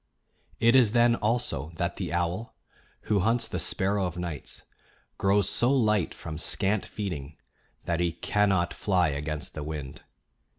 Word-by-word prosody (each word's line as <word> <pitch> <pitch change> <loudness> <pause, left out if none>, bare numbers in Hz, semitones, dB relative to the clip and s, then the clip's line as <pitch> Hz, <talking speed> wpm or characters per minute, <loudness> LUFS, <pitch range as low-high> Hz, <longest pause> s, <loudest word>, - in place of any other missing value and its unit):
It 115 +2 +5
is 120 -5 +5
then, 120 0 +5
also, 105 - -1
that 85 +1 -2
the 95 -3 -3
owl, 90 +5 -2 0.5
who 105 -2 +1
hunts 115 +5 +2
the - - -3
sparrow 95 -1 0
o' 90 - -8
nights, 85 -5 -5 0.6
grows 100 0 +3
so 120 +5 +3
light 105 -9 +2
from 80 -1 -7
scant 100 +3 +1
feeding 80 -8 -5 0.5
that 85 -1 0
he 85 -1 +1
cannot 95 -1 +1
fly 90 -5 +2
against 75 0 -4
the 75 - -5
wind. 75 -3 -6
95 Hz, 145 wpm, -27 LUFS, 80-105 Hz, 0.6 s, It